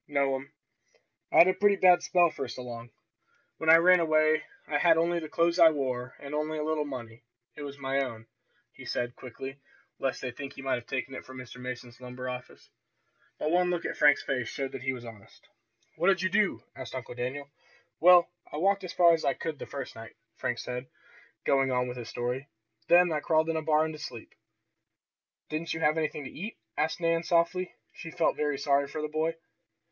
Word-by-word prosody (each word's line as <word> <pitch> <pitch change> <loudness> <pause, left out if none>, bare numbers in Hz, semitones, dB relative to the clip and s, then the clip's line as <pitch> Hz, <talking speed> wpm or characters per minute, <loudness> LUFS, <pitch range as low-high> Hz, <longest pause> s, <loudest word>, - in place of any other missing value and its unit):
"No'm, 140 -2 0 0.8
I - - +2
had 170 - +9
a 185 - +4
pretty 205 0 +3
bad 180 -2 +6
spell 175 -2 +3
first 130 -3 -6
along. 120 -2 -7 0.7
When 160 - -1
I 160 - +10
ran 180 +2 +6
away 155 -1 +3 0.2
I 145 -1 0
had 165 0 +5
only 170 +1 +2
the 155 -2 -7
clothes 170 +3 +1
I 165 -1 +9
wore, 130 -4 -3
and 140 +1 -8
only 155 +1 -1
a 150 - -2
little 155 -1 0
money. 120 -4 -8 0.3
It - - -9
was 140 -1 -7
my 135 0 -1
own!" 115 -4 -7 0.5
he - - -12
said, 120 0 -3
quickly, 135 +2 -8 0.4
lest 135 - -1
they 125 - -2
think 140 +3 -8
he 135 - -10
might 135 - 0
have 120 - -17
taken 135 0 -3
it - - -7
from 130 0 -11
Mr. 125 0 -10
Mason's 125 -1 -7
lumber 125 0 -7
office. 125 0 -8 0.7
But 155 - -1
one 180 +1 +3
look 175 -1 -1
at - - -2
Frank's 145 -1 +5
face 125 -4 -2
showed 135 -1 -4
that - - -7
he 130 +1 0
was 125 -2 -7
honest. 110 -4 -14 0.5
"What 175 - +1
did 190 -2 +3
you 185 - +2
do?" 205 +1 +1
asked 130 -1 -8
Uncle 125 -1 -6
Daniel. 130 +4 -5 0.5
"Well, 175 0 +7 0.2
I - - -5
walked 195 +4 +2
as 185 - -6
far 170 -1 +6
as 165 - 0
I 135 -2 +1
could 155 -3 -5
the - - -7
first 140 -2 -6
night," 115 0 -11 0.2
Frank 125 - -2
said, 125 +1 -5 0.6
going 135 -1 +3
on 125 0 +1
with 125 0 -6
his 115 -2 -7
story. 125 +3 -3 0.4
"Then 175 0 +6
I 150 - 0
crawled 160 +1 +2
in - - -3
a 160 - 0
barn 155 0 +2
to 155 - -9
sleep." 120 -6 -8 1.2
"Didn't 160 +1 -3
you - - -4
have 155 0 +3
anything 155 -1 -2
to 130 - -8
eat?" 205 +8 -7 0.2
asked 155 +3 0
Nan 165 -1 +2
softly. 175 +2 +1 0.2
She 165 - -8
felt 165 0 +1
very 150 -2 -1
sorry 140 0 +2
for 155 +2 -5
the - - -1
boy. 155 +2 -1
145 Hz, 210 wpm, -29 LUFS, 130-165 Hz, 1.2 s, I